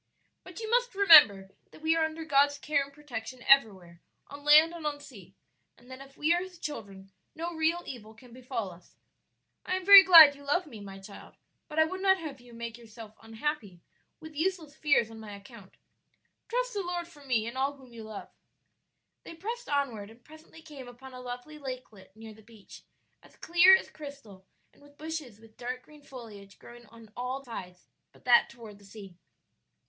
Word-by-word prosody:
"But - - -11
you 445 - -6
must 485 0 0
remember 295 - +7 0.2
that 310 - -18
we 320 +1 +2
are 325 - +1
under 315 0 -6
God's 285 -1 +2
care 285 0 0
and 280 - -13
protection 255 -4 -9
everywhere, 190 -10 +2 0.3
on 285 0 -11
land 305 +3 +6
and 335 -2 -9
on 290 -1 -4
sea; 195 -9 -15 0.4
and 245 +2 -19
that 260 +1 -10
if 275 0 -15
we 310 +3 +2
are 350 - 0
His 370 -1 -10
children 200 -11 -8 0.2
no 335 +2 -5
real 325 +2 -1
evil 220 -3 -10
can 240 +1 -17
befall 245 -5 -5
us. 175 +1 -19 0.7
I 370 - -2
am 375 -1 -5
very 400 0 +11
glad 330 -6 +9
you 285 - -16
love 350 +6 0
me, 240 -8 -12
my 195 -1 -10
child, 195 +1 -13 0.3
but 300 - -10
I 315 - +6
would 375 +4 -6
not 380 -1 +3
have 300 -7 -9
you 245 0 -17
make 235 0 -8
yourself 220 -1 -13
unhappy 225 - -5 0.4
with 315 -2 -12
useless 320 -2 -3
fears 255 -7 +1
on 225 - -11
my 210 -2 -9
account. 200 -1 -15 0.7
Trust - - -2
the 405 - -2
Lord 350 -1 -4
for 300 -4 -17
me 245 -5 0
and 235 +2 -7
all 270 +2 -1
whom 260 -3 -18
you 230 -1 -10
love." 215 -2 -10 0.9
They 335 - -11
pressed 460 +8 -7
onward 250 -8 -2
and 230 +2 -19
presently 315 +1 -16
came 285 -5 -11
upon 255 +2 -13
a 250 - -10
lovely 250 +5 -9
lakelet 250 -8 -10
near 220 0 -12
the 220 - -18
beach, 220 -2 -16 0.4
as - - -21
clear 350 +3 +5
as - - -4
crystal 275 -11 -12 0.3
and - - -25
with 290 0 -20
bushes 305 -8 -7
with 225 -1 -20
dark 250 +1 -6
green 300 -1 -18
foliage 215 -8 -13
growing 240 -1 -15
on 225 -1 -17
all 255 +3 -5
sides 180 -6 -10 0.3
but - - -24
that 245 -1 +5
toward 225 -4 -13
the - - -20
sea. 200 -2 -12
265 Hz, 195 wpm, -28 LUFS, 220-315 Hz, 0.9 s, very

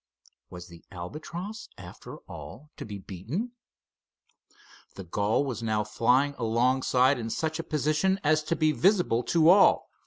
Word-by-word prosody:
Was 90 -1 -10
the 85 -1 -15
Albatross, 170 - -7
after - - -11
all, 150 +6 -11
to - - -7
be 105 -1 -6
beaten? 110 - -5 1.4
The 95 - -7
gull 100 +9 0
was 120 -5 -4
now 110 -2 0
flying 125 +7 +2
alongside 125 +3 +2
in 115 -1 -4
such 160 +6 -2
a - - -2
position 155 +6 0
as 155 +1 +3
to 170 - 0
be 155 -1 +2
visible 175 - +2
to 165 -1 +4
all. 195 +2 +5
135 Hz, 145 wpm, -27 LUFS, 110-160 Hz, 1.4 s, all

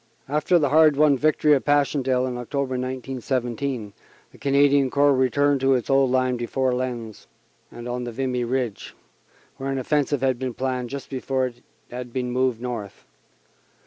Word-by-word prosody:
After 150 +5 +2
the 145 -4 +2
hard 155 0 +5
won 150 -1 +5
victory 150 +2 +3
of 135 - +2
Passchendaele 140 -3 +1
in 125 -1 -3
October, 130 +2 -3
1917, 130 -2 -3 0.4
the - - -18
Canadian 140 -1 +3
Corps 145 +1 +3
returned 135 +2 +2
to 135 0 +4
its 125 +1 -2
old 135 -1 +4
line 130 -1 +1
before 125 +2 -1
Lens 120 -4 -5 0.4
and 120 0 -9
on 125 0 -3
Vimy 125 +1 -2
Ridge, 120 -3 -3 0.6
where 135 +1 -4
an 135 - -2
offensive 145 +1 0
had 130 -2 +1
been 130 -2 -4
planned 130 -2 -2
just 140 +2 -7
before 130 0 -1
it 120 -1 -8 0.3
had 125 0 -6
been 125 0 -3
moved 125 -2 0
north. 115 -5 -6
130 Hz, 160 wpm, -23 LUFS, 125-140 Hz, 0.6 s, hard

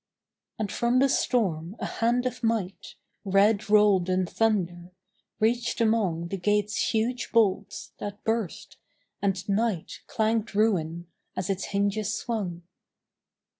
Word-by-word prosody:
And 210 -3 -3
from 240 +1 +1
the 270 +2 +5
storm 190 -9 0
a - - -3
hand 240 +2 0
of 250 -1 -3
might, 225 -5 -2 0.3
Red 200 +1 +3
rolled 205 -4 +4
in 185 0 +2
thunder, 175 -4 0 0.5
reached 235 +2 +1
among 200 -7 +1
The 195 - -3
gate's 205 +2 +1
huge 240 +2 -1
bolts, 205 -2 +1
that 205 0 -6
burst 225 -5 -3 0.4
and 195 -2 -1
night 205 -3 -1
Clanged 220 -1 0
ruin 175 -6 +1 0.3
as 185 +1 -1
its 195 0 -2
hinges 205 +1 0
swung. 195 -7 -3
205 Hz, 125 wpm, -27 LUFS, 185-225 Hz, 0.5 s, the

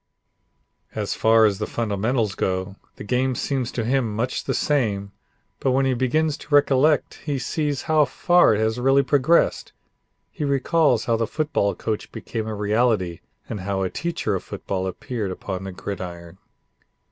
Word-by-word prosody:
As - - -2
far 110 0 +4
as 100 -2 +1
the 105 - -2
fundamentals 110 0 -1
go, 95 +1 -2 0.2
the - - -9
game 125 +4 0
seems 130 -2 -2
to 115 - -2
him 120 -3 0
much 125 +4 -2
the - - -1
same, 105 -9 0 0.5
but 130 - +1
when 135 +1 +2
he 130 - +2
begins 145 +5 +1
to 150 - -1
recollect 145 +1 +3
he 145 -3 -1
sees 145 +2 -2
how 155 -2 +3
far 175 -1 +4
it - - -1
has 110 +2 0
really 135 +2 +4
progressed. 145 +5 +2 0.6
He - - -5
recalls 140 -2 +2
how 115 -1 +2
the 115 -1 -1
football 150 -10 0
coach 110 -2 -4
became 110 -2 -5
a 110 - -3
reality 105 -4 +1 0.3
and 105 - -5
how 95 0 -2
a 95 - -2
teacher 170 -11 -2
of 95 - -2
football 95 -1 -4
appeared 105 +2 -4
upon 95 0 -5
the 95 - -5
gridiron. 90 -3 -7
115 Hz, 165 wpm, -23 LUFS, 100-135 Hz, 0.6 s, far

